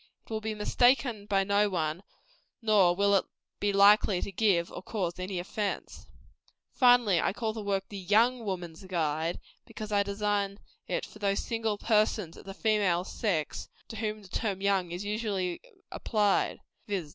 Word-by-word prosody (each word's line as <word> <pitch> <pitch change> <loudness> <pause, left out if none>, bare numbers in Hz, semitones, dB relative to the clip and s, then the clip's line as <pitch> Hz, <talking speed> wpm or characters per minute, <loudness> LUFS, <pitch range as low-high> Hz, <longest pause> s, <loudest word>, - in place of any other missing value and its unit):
It - - -16
will 220 -1 -2
be 220 0 -3
mistaken 240 0 +2
by 195 -1 +2
no 205 +1 +2
one, 160 -2 -2 0.6
nor 205 -6 +4
will 200 +1 +3
it 195 - +3 0.3
be 205 - +1
likely 200 -1 +5
to - - -4
give 190 -4 +2
or - - -7
cause 185 -3 -3
any 185 0 -4
offence. 200 +3 -4 0.7
Finally, 245 -8 +5
I - - 0
call 220 0 -2
the 220 - -5
work 195 -1 -1
"The 200 - -6
YOUNG 225 +6 +3
Woman's 180 -4 -5
Guide," 165 -2 -1 0.2
because 215 -1 -8
I 205 -1 +3
design 200 0 -1 0.3
it - - -2
for 210 - -14
those 200 -1 0
single 225 -2 -2
persons 210 -5 +1
of - - -13
the 195 0 -8
female 200 -6 +2
sex 185 -6 -2 0.2
to 225 - -7
whom 215 -1 -3
the - - -13
term 195 0 -2
young 195 -3 +1
is 175 +4 -5
usually 205 -4 -2 0.3
applied; 210 -3 +1 0.3
viz. 190 -7 -3
200 Hz, 170 wpm, -29 LUFS, 185-215 Hz, 0.7 s, likely